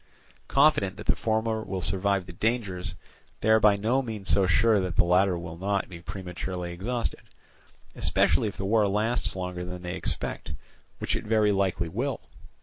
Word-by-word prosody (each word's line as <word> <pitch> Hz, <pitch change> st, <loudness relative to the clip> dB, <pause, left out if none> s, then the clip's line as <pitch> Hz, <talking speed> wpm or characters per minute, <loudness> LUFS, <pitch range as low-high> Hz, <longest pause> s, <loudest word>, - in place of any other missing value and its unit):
Confident 135 Hz, -10 st, +3 dB
that -, -, -8 dB
the -, -, +2 dB
former 110 Hz, 0 st, 0 dB
will 95 Hz, -4 st, -4 dB
survive 100 Hz, -1 st, +1 dB
the 90 Hz, -, -10 dB
dangers, 95 Hz, -4 st, -2 dB, 0.5 s
they 110 Hz, -, +3 dB
are 110 Hz, -, +6 dB
by 105 Hz, -1 st, +5 dB
no 115 Hz, +7 st, +1 dB
means 110 Hz, -6 st, -2 dB
so 95 Hz, -2 st, +4 dB
sure 105 Hz, +4 st, +4 dB
that 90 Hz, -3 st, -2 dB
the -, -, +5 dB
latter 90 Hz, +1 st, +3 dB
will 85 Hz, -1 st, -7 dB
not 100 Hz, +1 st, -1 dB
be 85 Hz, -2 st, -9 dB
prematurely 90 Hz, -1 st, -5 dB
exhausted, 115 Hz, +7 st, -3 dB, 0.7 s
especially 80 Hz, +8 st, +2 dB
if 100 Hz, -, -6 dB
the 95 Hz, -, -3 dB
war 105 Hz, +1 st, +3 dB
last 110 Hz, +4 st, 0 dB
longer 90 Hz, -1 st, -4 dB
than 90 Hz, 0 st, -7 dB
they 90 Hz, 0 st, -4 dB
expect, 95 Hz, -, -3 dB, 0.4 s
which -, -, -1 dB
it -, -, -3 dB
very 105 Hz, -1 st, +3 dB
likely 95 Hz, -4 st, 0 dB
will. 125 Hz, +9 st, -2 dB
100 Hz, 175 wpm, -27 LUFS, 90-110 Hz, 0.7 s, are